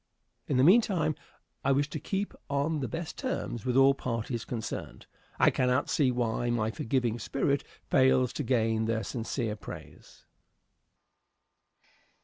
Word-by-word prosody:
In 135 - +1
the 130 - +5
meantime 180 - +4 0.5
I 140 - +2
wish 140 +1 +2
to 155 - -3
keep 195 +5 -3 0.2
on 145 +3 0
the 130 - -2
best 165 +3 -5
terms 195 - -3
with 125 0 +2
all 135 +1 +7
parties 115 -3 -3
concerned. 115 -2 -5 0.3
I - - +5
cannot 125 +2 +1
see 140 -4 +3
why 120 -1 0
my 110 -2 0
forgiving 120 +2 -1
spirit 140 +4 0 0.2
fails 130 -2 +3
to 150 - -3
gain 115 -3 +1
their 110 -1 0
sincere 115 0 -3
praise. 105 - -11
130 Hz, 135 wpm, -29 LUFS, 115-140 Hz, 0.5 s, all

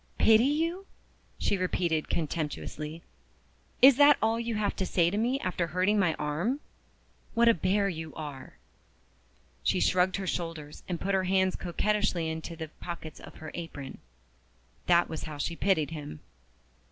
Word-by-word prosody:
"Pity 225 +2 +6
you?" 330 +7 0 0.5
she 200 - 0
repeated 170 -3 0
contemptuously. 155 0 -3 0.8
"Is 265 -1 +9
that 290 0 +7
all 225 +1 +1
you 235 -1 -2
have 210 -1 0
to 190 - 0
say 170 -1 +2
to 205 - -1
me 250 +4 +1
after 180 -1 -1
hurting 185 +5 +2
my 175 -5 +2
arm? 170 - -1 0.8
What 235 +1 +4
a 230 - +7
bear 200 +2 +1
you 160 -4 -5
are!" 145 -4 -8 1.0
She 180 - +1
shrugged 185 +1 +3
her 195 - -3
shoulders 165 -4 -4
and 175 -2 -3
put 195 +1 -1
her 190 -1 +2
hands 190 0 +2
coquettishly 180 -2 0
into 160 +1 -6
the 160 -1 -6
pockets 170 -3 -7
of - - -12
her 155 -1 -9
apron. 145 -5 -7 0.9
That 175 -1 +5
was 160 - -5
how 155 -2 -7
she 165 +3 -2
pitied 165 -5 +1
him! 145 - -7
180 Hz, 155 wpm, -29 LUFS, 160-210 Hz, 1.0 s, Is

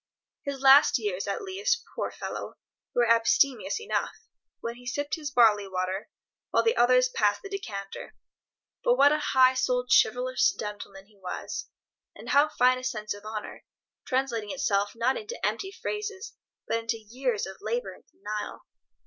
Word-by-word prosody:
His 280 -2 -5
last 275 +2 +7
years, 205 -5 -3
at 200 - -3
least, 420 +5 -1
poor - - -2
fellow, - - -6 0.4
were 240 -1 +3
abstemious 230 - +3
enough, 445 - -2 0.4
when 235 - -4
he 245 0 -13
sipped 290 +4 -3
his 305 -3 -2
barley 220 -6 +4
water, 185 +1 -3 0.4
while - - +2
the 455 +1 +2
others 250 +1 +5
passed 210 -5 0
the 395 - -7
decanter. 200 - -6 0.7
But - - +4
what 285 - +6
a 305 - +2
high 260 -3 +4
souled 250 -1 0
chivalrous 250 +2 +3
gentleman 205 -2 -7
he 205 -1 -26
was, 185 -1 -5 0.5
with - - -9
how 290 +2 +5
fine 255 -3 +3
a - - -11
sense 215 -5 -3
of 205 +1 -12
honour, 215 -1 -6 0.4
translating 245 -5 -1
itself 205 -7 0
not 240 +3 +1
into 445 +4 -6
empty 385 -1 -2
phrases, 420 +1 -5 0.3
but 230 - 0
into 230 0 -2
years 230 +1 -2
of 190 0 -9
labour 485 +1 -2
and - - -18
denial! 215 - -6
250 Hz, 160 wpm, -27 LUFS, 210-285 Hz, 0.7 s, last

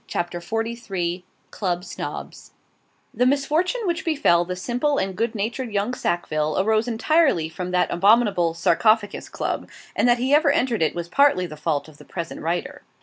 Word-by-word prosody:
CHAPTER 175 0 -3
XLIII 195 -4 -3 0.3
CLUB 180 -3 -2
SNOBS - - -7 0.6
The 250 - +2
misfortune 310 - +1
which 350 +1 -1
befell 285 - +3
the 180 +1 -4
simple 245 +9 -1
and 190 -1 -1
good 230 +3 -1
natured 230 +4 -3
young 205 +4 -1
Sackville, 155 -8 -1
arose 220 +3 +2
entirely 240 - +2
from 180 +3 -5
that 180 0 +1
abominable 195 -4 +3
'Sarcophagus 205 +5 +2
Club;' - - -3 0.3
and - - +2
that 240 - +5
he 260 +3 0
ever 300 0 +5
entered 245 -6 +1
it 160 - +1
was 170 -1 -4
partly 275 -4 +3
the 155 - -8
fault 150 -1 -2
of 155 -2 -16
the - - -14
present 170 -2 -6
writer. 175 - -3
210 Hz, 165 wpm, -23 LUFS, 175-250 Hz, 0.6 s, that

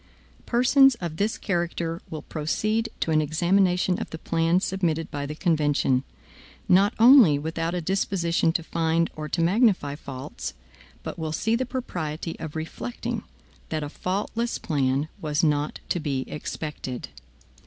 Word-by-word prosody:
Persons 255 +2 +5
of 170 -6 -5
this 210 +4 0
character 170 -3 -2
will 155 -2 -6
proceed 215 +9 -1
to 160 - 0
an 155 0 +4
examination 180 +4 +2
of - - -5
the 160 - -6
plan 165 +2 +1
submitted 175 -4 -1
by 145 -1 -3
the 150 - -5
convention, 145 -6 +2 0.6
not 195 +4 +4
only 230 - +8
without 165 +3 -2
a 175 - -1
disposition 170 -2 +1
to 165 - -1
find 165 0 0
or 155 -1 -5
to 170 - 0
magnify 185 - +3
faults; 135 - -7 0.5
but - - -6
will 160 -1 -2
see 220 +8 +1
the 255 +1 -1
propriety 170 - -4
of 160 -1 -6
reflecting, 155 -6 -4 0.5
that 155 -1 -2
a 145 - -4
faultless 210 +8 -2
plan 140 -1 0
was 150 0 0
not 150 -1 +1
to 175 - +1
be 140 -4 -1
expected. 150 - -5
165 Hz, 145 wpm, -25 LUFS, 150-190 Hz, 0.6 s, only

